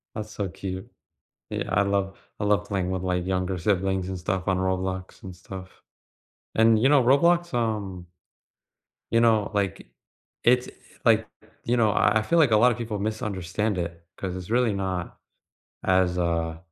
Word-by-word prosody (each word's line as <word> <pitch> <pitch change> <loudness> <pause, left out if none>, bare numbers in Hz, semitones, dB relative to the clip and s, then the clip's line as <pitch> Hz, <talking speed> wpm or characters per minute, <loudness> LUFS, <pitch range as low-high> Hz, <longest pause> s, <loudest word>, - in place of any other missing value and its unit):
That's 110 0 -5
so 100 -2 -3
cute. 95 +2 -6 0.6
Yeah, - - -3
I 100 - +4
love 100 -1 -1 0.2
I - - 0
love 105 0 +2
playing 95 -3 -1
with 95 -1 -2
my 90 -1 0
younger 90 +1 -1
siblings 95 0 0
and 95 -1 -4
stuff 95 0 -2
on 95 -1 +2
Roblox 95 0 -2
and 95 -1 -8
stuff. 95 +1 -11 0.7
And, 110 -1 +5
you 130 - +5
know, 145 -2 +5
Roblox, 170 +6 +3
um 105 -6 -2 1.0
you 115 +1 +4
know, 110 -3 +3
like, 100 -7 -2 0.6
it's, 125 +1 +3 0.4
like, - - +4 0.4
you 120 +1 +1
know, 110 -3 +4
I 110 - +3
I - - -1
feel 165 +10 +2
like 145 -7 +5
a 110 - +6
lotta 120 +2 +5
people 115 -3 -4
misunderstand 105 -1 -2
it 85 -1 -4
'cause 95 -2 -4
it's 90 0 -7
really 120 -1 +2
not 95 -3 -3 0.7
as, 95 -1 +2
uh, 85 -2 -1
95 Hz, 165 wpm, -25 LUFS, 95-110 Hz, 1.0 s, a